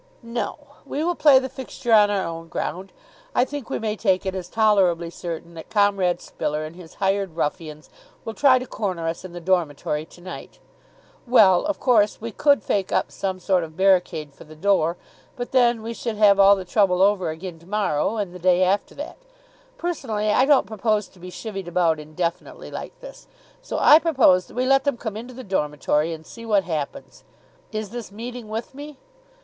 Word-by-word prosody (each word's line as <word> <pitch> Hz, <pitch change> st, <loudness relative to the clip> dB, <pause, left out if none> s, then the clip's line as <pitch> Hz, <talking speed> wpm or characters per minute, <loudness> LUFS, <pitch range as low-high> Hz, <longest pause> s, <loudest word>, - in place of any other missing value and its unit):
"No, 235 Hz, +1 st, -4 dB, 0.3 s
we 295 Hz, -, -3 dB
will 350 Hz, +1 st, +1 dB
play 295 Hz, -5 st, +6 dB
the 260 Hz, 0 st, +1 dB
fixture 260 Hz, -2 st, -4 dB
on 210 Hz, -1 st, +6 dB
our 200 Hz, -2 st, 0 dB
own 165 Hz, 0 st, -6 dB
ground. 180 Hz, +3 st, -4 dB, 0.4 s
I 245 Hz, -, +4 dB
think 285 Hz, -3 st, -7 dB
we -, -, -1 dB
may 215 Hz, -1 st, -2 dB
take 195 Hz, -3 st, +1 dB
it 190 Hz, -, -2 dB
as 185 Hz, -2 st, -6 dB
tolerably 190 Hz, -6 st, +2 dB
certain 170 Hz, -1 st, -7 dB
that 160 Hz, -1 st, -10 dB
Comrade 200 Hz, -5 st, +2 dB
Spiller 150 Hz, +1 st, -3 dB
and 155 Hz, +2 st, -9 dB
his 175 Hz, -3 st, -13 dB
hired 195 Hz, -3 st, -1 dB
ruffians 155 Hz, -1 st, -4 dB, 0.4 s
will 225 Hz, -, -4 dB
try 265 Hz, +1 st, +5 dB
to 255 Hz, -, -4 dB
corner 185 Hz, -8 st, -3 dB
us 165 Hz, +2 st, -4 dB
in 185 Hz, -2 st, -9 dB
the 175 Hz, -, -6 dB
dormitory 155 Hz, -4 st, -1 dB
to 175 Hz, -, -18 dB
night. 185 Hz, +1 st, -9 dB, 0.7 s
Well, 200 Hz, -6 st, +5 dB
of 305 Hz, -, -2 dB
course, 215 Hz, -5 st, +3 dB
we 230 Hz, +1 st, -6 dB
could 280 Hz, +1 st, +3 dB
fake 195 Hz, -2 st, -1 dB
up -, -, 0 dB
some 190 Hz, -1 st, -3 dB
sort 185 Hz, -1 st, +1 dB
of 160 Hz, 0 st, -10 dB
barricade 180 Hz, -6 st, +2 dB
for -, -, -14 dB
the 155 Hz, +1 st, -14 dB
door, 170 Hz, -1 st, +1 dB, 0.4 s
but 245 Hz, 0 st, -6 dB
then 240 Hz, -3 st, +3 dB
we 230 Hz, +1 st, -4 dB
should 230 Hz, -1 st, -4 dB
have 205 Hz, -2 st, +5 dB
all 200 Hz, +1 st, +7 dB
the 190 Hz, -2 st, -6 dB
trouble 185 Hz, -1 st, +3 dB
over 195 Hz, -4 st, +2 dB
again 165 Hz, +1 st, -7 dB
to 170 Hz, -, -19 dB
morrow 205 Hz, -1 st, 0 dB
and 200 Hz, -4 st, -3 dB
the 180 Hz, -, -9 dB
day 180 Hz, +1 st, +3 dB
after 190 Hz, +2 st, 0 dB
that. 295 Hz, +2 st, -7 dB, 0.6 s
Personally 230 Hz, -, -2 dB
I 255 Hz, -, +4 dB
don't 280 Hz, -4 st, +4 dB
propose 215 Hz, 0 st, -1 dB
to 185 Hz, -, -21 dB
be 180 Hz, +1 st, -9 dB
chivvied 195 Hz, -1 st, -7 dB
about 170 Hz, -2 st, +1 dB
indefinitely 160 Hz, +3 st, -5 dB
like -, -, -8 dB
this, -, -, -12 dB, 0.3 s
so -, -, -5 dB
I 300 Hz, -, +7 dB
propose 260 Hz, -, +3 dB
that -, -, -15 dB
we 250 Hz, +1 st, 0 dB
let 270 Hz, +1 st, +4 dB
them 285 Hz, -4 st, 0 dB
come 220 Hz, -3 st, -5 dB
into 240 Hz, +3 st, -8 dB
the 260 Hz, -, -8 dB
dormitory, 150 Hz, -4 st, 0 dB
and 160 Hz, -1 st, -8 dB
see 230 Hz, -, -11 dB
what 210 Hz, -4 st, +2 dB
happens. 160 Hz, -, -5 dB, 0.5 s
Is 215 Hz, -2 st, -4 dB
this 235 Hz, -4 st, -7 dB
meeting 235 Hz, +1 st, -8 dB
with 225 Hz, +4 st, -5 dB
me?" 290 Hz, +1 st, -9 dB
195 Hz, 200 wpm, -23 LUFS, 175-230 Hz, 0.7 s, all